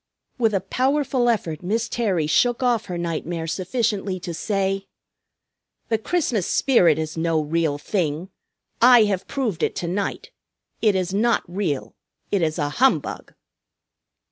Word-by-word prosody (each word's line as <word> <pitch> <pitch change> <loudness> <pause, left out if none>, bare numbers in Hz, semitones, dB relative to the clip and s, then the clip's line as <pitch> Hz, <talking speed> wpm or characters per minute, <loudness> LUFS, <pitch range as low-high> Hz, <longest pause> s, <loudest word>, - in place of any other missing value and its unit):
With 225 -3 +2
a 190 - +1
powerful 260 +3 +1
effort 170 -9 -1
Miss 220 +6 -1
Terry 195 -9 0
shook 240 - +2
off 240 -3 +2
her 180 -3 -5
nightmare 170 0 -3
sufficiently 195 +2 -1
to 175 -1 -5
say, 195 +2 -1 1.0
"The 225 - +1
Christmas 245 - 0
spirit 180 - +4
is 155 0 -4
no 165 -1 +1
real 155 -1 0
thing. 165 +1 -2 0.5
I 245 -1 +8
have 195 -3 -1
proved 225 - -2
it - - 0
to 170 - -3
night. 200 - -3 0.5
It 210 -3 +3
is 185 0 -1
not 230 +4 +2
real. 175 -6 -3 0.4
It 200 - +2
is 155 0 0
a 145 -3 0
humbug!" 260 - 0
195 Hz, 140 wpm, -23 LUFS, 165-230 Hz, 1.0 s, I